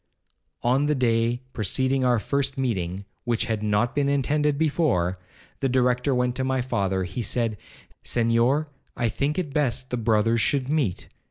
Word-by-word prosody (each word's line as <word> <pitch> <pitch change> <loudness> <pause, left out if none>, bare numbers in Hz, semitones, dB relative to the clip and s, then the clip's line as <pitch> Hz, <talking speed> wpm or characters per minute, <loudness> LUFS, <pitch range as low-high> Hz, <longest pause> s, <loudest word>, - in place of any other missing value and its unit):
'On 130 +4 +2
the 150 - +2
day 120 -1 +1
preceding 130 +6 0
our 125 -1 +3
first 140 +4 -1
meeting, 100 -7 -2 0.2
(which 120 -2 0
had 110 -2 -2
not 105 +3 +1
been 140 -1 +1
intended 145 +1 +1
before), 140 - +1 0.4
the 135 - 0
Director 125 +1 +2
went 125 0 +1
to 130 - -1
my 130 0 0
father; 100 -6 -1
he 95 +6 -4
said, 115 0 -1 0.5
'Senhor, 120 +6 +2 0.3
I 120 - +1
think 145 - -1
it 160 -7 -2
best 130 -4 0
the 125 - 0
brothers 115 0 +2
should 135 +4 0
meet. 140 - -1
125 Hz, 160 wpm, -25 LUFS, 115-140 Hz, 0.5 s, our